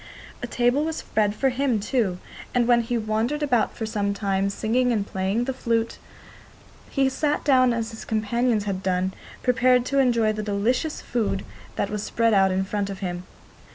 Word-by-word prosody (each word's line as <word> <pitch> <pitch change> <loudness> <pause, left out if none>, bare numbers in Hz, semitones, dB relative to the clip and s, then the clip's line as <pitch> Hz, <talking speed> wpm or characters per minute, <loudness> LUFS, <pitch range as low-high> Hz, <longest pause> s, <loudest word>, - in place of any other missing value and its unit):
A - - -3
table 245 +4 +2
was 320 0 -2
spread 210 -6 0
for 270 +4 +2
him 255 -3 0
too, 205 -4 0 0.4
and 240 -1 +3
when 240 -1 +5
he 235 +1 -2
had 225 -2 -2
wandered 230 +8 0
about 245 -6 +1
for 225 - -2
some 205 -2 -1
time, 195 -1 0
singing 240 +5 +1
and 210 -4 0
playing 195 +4 -1
the 265 +2 -2
flute, 230 -2 -1 0.9
he 270 -1 +2
sat 295 +3 0
down 255 -3 +4
as 230 -1 -2
his 220 - -8
companions 220 +1 0
had 195 -2 -3
done, 185 0 0 0.3
prepared 250 0 +3
to 275 +1 +1
enjoy 235 -4 +3
the 215 - -3
delicious 220 +9 -1
food 220 -5 -1 0.3
that 200 - -1
was 210 -1 -2
spread 230 +1 +1
out 195 -1 +5
in 190 +1 +1
front 200 0 -2
of 195 - -5
him. 180 -1 -4
225 Hz, 190 wpm, -24 LUFS, 200-250 Hz, 0.9 s, when